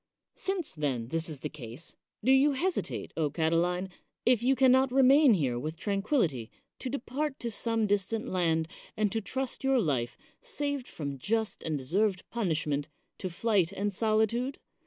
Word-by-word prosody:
Since, 380 Hz, -4 st, -3 dB
then, 130 Hz, -7 st, -2 dB
this 165 Hz, +2 st, -1 dB
is 145 Hz, -3 st, -6 dB
the -, -, -2 dB
case, 130 Hz, +2 st, -7 dB, 0.3 s
do 255 Hz, -, +4 dB
you 275 Hz, +2 st, +5 dB
hesitate, 355 Hz, +7 st, -2 dB
O 155 Hz, -2 st, +1 dB
Catiline, 170 Hz, +4 st, +1 dB, 0.4 s
if 245 Hz, -2 st, +4 dB
you 260 Hz, +3 st, +3 dB
can 265 Hz, -1 st, +5 dB
not 260 Hz, 0 st, +4 dB
remain 270 Hz, -1 st, +6 dB
here 130 Hz, -8 st, 0 dB
with 155 Hz, +5 st, -4 dB
tran 200 Hz, +3 st, -1 dB
quillity, 160 Hz, -, 0 dB, 0.3 s
to 260 Hz, -, -3 dB
depart 280 Hz, +2 st, -3 dB
to 235 Hz, -, -3 dB
some 225 Hz, 0 st, 0 dB
distant 205 Hz, +2 st, 0 dB
land, 165 Hz, -3 st, +1 dB, 0.3 s
and 210 Hz, -2 st, +2 dB
to 225 Hz, -, 0 dB
trust 260 Hz, +5 st, -3 dB
your 265 Hz, -1 st, +3 dB
life, 135 Hz, -, 0 dB, 0.2 s
saved 290 Hz, -, -3 dB
from 140 Hz, -3 st, -5 dB
just 220 Hz, -, -1 dB
and 155 Hz, -2 st, -2 dB
deserved 185 Hz, +8 st, 0 dB
punishment, 155 Hz, -9 st, -1 dB, 0.3 s
to 185 Hz, -, -3 dB
flight 190 Hz, -1 st, +1 dB
and 200 Hz, +1 st, -2 dB
solitude? 220 Hz, +5 st, +1 dB
205 Hz, 165 wpm, -30 LUFS, 160-255 Hz, 0.4 s, remain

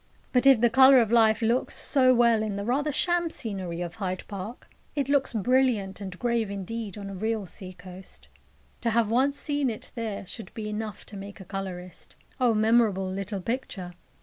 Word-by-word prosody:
But 255 Hz, +1 st, +4 dB
if 270 Hz, -4 st, +7 dB
the 240 Hz, -, +5 dB
colour 265 Hz, +1 st, +8 dB
of 230 Hz, -2 st, +1 dB
life 225 Hz, -1 st, +4 dB
looks 235 Hz, +3 st, +1 dB
so 260 Hz, -3 st, +3 dB
well 235 Hz, -3 st, +4 dB
in 215 Hz, -2 st, -2 dB
the 200 Hz, 0 st, -4 dB
rather 285 Hz, +6 st, 0 dB
sham 345 Hz, +3 st, +1 dB
scenery 190 Hz, -, -4 dB
of 175 Hz, +1 st, -5 dB
Hyde 185 Hz, -1 st, -2 dB
Park, 205 Hz, +4 st, -7 dB, 0.3 s
it 280 Hz, -2 st, -1 dB
looks 280 Hz, -2 st, +2 dB
brilliant 225 Hz, -4 st, +1 dB
and 190 Hz, -2 st, -6 dB
grave 235 Hz, -2 st, 0 dB
indeed 200 Hz, +2 st, -5 dB
on 200 Hz, -1 st, -6 dB
a 195 Hz, -, -6 dB
real 215 Hz, +2 st, -2 dB
sea 185 Hz, +1 st, -8 dB
coast. 180 Hz, +1 st, -12 dB, 0.5 s
To 235 Hz, -, +1 dB
have 225 Hz, -1 st, +1 dB
once 270 Hz, +4 st, +2 dB
seen 290 Hz, -3 st, 0 dB
it 220 Hz, -, -7 dB
there 220 Hz, -4 st, -4 dB
should 225 Hz, +4 st, -8 dB
be 215 Hz, -2 st, -4 dB
enough 210 Hz, 0 st, -5 dB
to 210 Hz, -, -11 dB
make 200 Hz, +2 st, -9 dB
a 190 Hz, -, -10 dB
colourist. 185 Hz, -2 st, -7 dB, 0.2 s
O 245 Hz, -3 st, +3 dB
memorable 215 Hz, -3 st, +3 dB
little 195 Hz, +1 st, -4 dB
picture! 215 Hz, -7 st, -4 dB
220 Hz, 190 wpm, -27 LUFS, 195-245 Hz, 0.5 s, colour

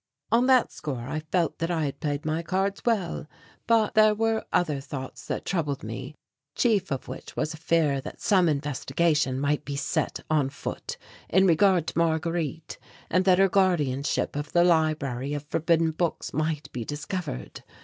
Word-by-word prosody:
On 240 Hz, +3 st, +4 dB
that 255 Hz, -2 st, +4 dB
score 130 Hz, -5 st, -5 dB
I 155 Hz, -, -2 dB
felt 175 Hz, -3 st, +1 dB
that 165 Hz, +1 st, -1 dB
I 165 Hz, -3 st, 0 dB
had 140 Hz, 0 st, -4 dB
played 145 Hz, +1 st, -2 dB
my 155 Hz, +1 st, 0 dB
cards 195 Hz, +3 st, -1 dB
well, 195 Hz, -10 st, 0 dB, 0.4 s
but 225 Hz, -2 st, +3 dB
there 215 Hz, -1 st, +5 dB
were 225 Hz, 0 st, +1 dB
other 150 Hz, -6 st, +1 dB
thoughts 135 Hz, -1 st, -7 dB
that -, -, -3 dB
troubled 150 Hz, -7 st, -1 dB
me, 130 Hz, +7 st, -6 dB, 0.4 s
chief 210 Hz, -7 st, +2 dB
of 135 Hz, -3 st, -3 dB
which -, -, -8 dB
was 155 Hz, -, -1 dB
a -, -, -9 dB
fear 155 Hz, -4 st, +1 dB
that -, -, -9 dB
some 185 Hz, -4 st, +3 dB
investigation 145 Hz, -1 st, 0 dB
might 145 Hz, +1 st, 0 dB
be 140 Hz, -, -5 dB
set 140 Hz, -, -1 dB
on 150 Hz, -4 st, +2 dB
foot 145 Hz, -, -6 dB, 0.3 s
in 190 Hz, +2 st, +4 dB
regard 180 Hz, 0 st, +4 dB
to -, -, -5 dB
Marguerite 165 Hz, -1 st, -1 dB, 0.3 s
and 185 Hz, +2 st, +3 dB
that 185 Hz, -2 st, +5 dB
her 195 Hz, +1 st, +5 dB
guardianship 155 Hz, -11 st, +1 dB
of 145 Hz, 0 st, -4 dB
the 175 Hz, -, +5 dB
library 150 Hz, -5 st, +1 dB
of 145 Hz, -, -4 dB
forbidden 165 Hz, +2 st, +1 dB
books 165 Hz, +1 st, -2 dB
might 155 Hz, -1 st, -2 dB
be 120 Hz, -, -4 dB
discovered. 145 Hz, -, -5 dB
160 Hz, 170 wpm, -26 LUFS, 145-180 Hz, 0.4 s, there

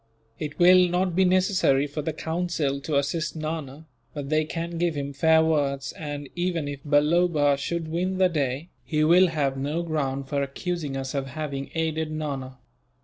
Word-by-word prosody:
It 150 Hz, -1 st, -5 dB
will 180 Hz, 0 st, +6 dB
not 180 Hz, 0 st, 0 dB
be 190 Hz, +1 st, +4 dB
necessary 185 Hz, -7 st, +3 dB
for 145 Hz, +1 st, -4 dB
the 160 Hz, +2 st, -2 dB
Council 160 Hz, -3 st, -2 dB
to 145 Hz, 0 st, -1 dB
assist 150 Hz, +3 st, -1 dB
Nana, 155 Hz, -2 st, -5 dB, 0.3 s
but 140 Hz, -2 st, -5 dB
they 155 Hz, 0 st, +2 dB
can 170 Hz, +1 st, -4 dB
give 170 Hz, -2 st, +1 dB
him 140 Hz, 0 st, -4 dB
fair 160 Hz, +3 st, +4 dB
words 140 Hz, -3 st, 0 dB
and, 145 Hz, -2 st, -6 dB
even 175 Hz, -4 st, -1 dB
if 145 Hz, -1 st, -5 dB
Balloba 150 Hz, 0 st, +3 dB
should 165 Hz, +4 st, -3 dB
win 180 Hz, +4 st, -1 dB
the 185 Hz, 0 st, +5 dB
day, 145 Hz, -1 st, -2 dB
he 155 Hz, -2 st, 0 dB
will 175 Hz, +4 st, +6 dB
have 145 Hz, -5 st, -1 dB
no 150 Hz, +5 st, -2 dB
ground 140 Hz, -4 st, -2 dB
for 140 Hz, 0 st, -1 dB
accusing 145 Hz, +1 st, -3 dB
us 135 Hz, 0 st, -4 dB
of 135 Hz, -1 st, -2 dB
having 140 Hz, -1 st, -5 dB
aided 160 Hz, -1 st, -1 dB
Nana. 140 Hz, -4 st, -4 dB
155 Hz, 175 wpm, -25 LUFS, 140-170 Hz, 0.3 s, will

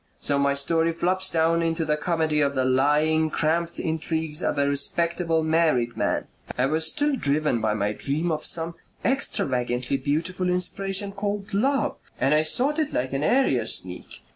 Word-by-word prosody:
So 140 Hz, -1 st, 0 dB
my 140 Hz, 0 st, +2 dB
story 165 Hz, +4 st, +1 dB
flops 180 Hz, +3 st, +1 dB
down 165 Hz, 0 st, +2 dB
into 165 Hz, 0 st, 0 dB
the 150 Hz, -1 st, +1 dB
comedy 155 Hz, -1 st, 0 dB
of 140 Hz, -1 st, +1 dB
the 130 Hz, -1 st, +1 dB
lying, 150 Hz, +4 st, +2 dB
cramped 165 Hz, +2 st, -1 dB
intrigues 160 Hz, -2 st, -2 dB
of -, -, -1 dB
a 140 Hz, 0 st, +2 dB
respectable, 165 Hz, +3 st, 0 dB
married 155 Hz, -7 st, +1 dB
man...I 125 Hz, -, -2 dB
was 160 Hz, +3 st, +1 dB
still 290 Hz, -, +1 dB
driven 145 Hz, -, 0 dB
by 110 Hz, -1 st, 0 dB
my 105 Hz, 0 st, -1 dB
dream 155 Hz, +9 st, -2 dB
of 155 Hz, -, -2 dB
some 165 Hz, 0 st, -3 dB, 0.3 s
extravagantly 125 Hz, -, 0 dB
beautiful 165 Hz, +7 st, -1 dB
inspiration 195 Hz, +2 st, 0 dB
called 200 Hz, 0 st, -4 dB
love 270 Hz, +7 st, +1 dB, 0.2 s
and 135 Hz, +3 st, +2 dB
I 155 Hz, -, +4 dB
sought 265 Hz, -, +1 dB
it 305 Hz, -2 st, 0 dB
like 130 Hz, +2 st, -2 dB
an 135 Hz, +1 st, -1 dB
area 260 Hz, -, +2 dB
sneak. -, -, -4 dB
160 Hz, 165 wpm, -24 LUFS, 140-175 Hz, 0.3 s, I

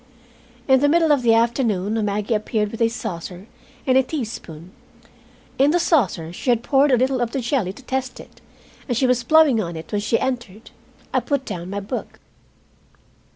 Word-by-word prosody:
In 265 Hz, -1 st, +5 dB
the 290 Hz, +2 st, +3 dB
middle 325 Hz, 0 st, +3 dB
of 285 Hz, -3 st, +3 dB
the 230 Hz, -2 st, +4 dB
afternoon 225 Hz, -3 st, +1 dB
Maggie 210 Hz, +2 st, -1 dB
appeared, 210 Hz, -1 st, -1 dB
with 225 Hz, -, -7 dB
a 230 Hz, -, +4 dB
saucer 190 Hz, -5 st, -6 dB, 0.4 s
and 260 Hz, 0 st, +4 dB
a -, -, +5 dB
teaspoon. 215 Hz, -, -6 dB, 0.9 s
In 275 Hz, +2 st, +5 dB
the 350 Hz, +3 st, +2 dB
saucer 205 Hz, -, +1 dB
she 250 Hz, -, -4 dB
had 240 Hz, -1 st, +2 dB
poured 275 Hz, +1 st, +3 dB
a 255 Hz, -, +5 dB
little 260 Hz, +1 st, +1 dB
of 235 Hz, -1 st, -2 dB
the 275 Hz, -, -1 dB
jelly 240 Hz, -6 st, -1 dB
to 240 Hz, +7 st, -14 dB
test 260 Hz, -1 st, -3 dB
it, -, -, -15 dB, 0.5 s
and 245 Hz, -4 st, -1 dB
she 260 Hz, -, +2 dB
was 250 Hz, -1 st, +2 dB
blowing 290 Hz, -3 st, +5 dB
on 170 Hz, -3 st, -5 dB
it 160 Hz, 0 st, -9 dB
when 205 Hz, -1 st, -1 dB
she 215 Hz, +2 st, +1 dB
entered. 235 Hz, -5 st, -4 dB, 0.4 s
I -, -, +3 dB
put 280 Hz, -2 st, -2 dB
down 175 Hz, 0 st, -6 dB
my 200 Hz, +1 st, -4 dB
book. 220 Hz, +6 st, -6 dB
235 Hz, 190 wpm, -21 LUFS, 205-265 Hz, 0.9 s, In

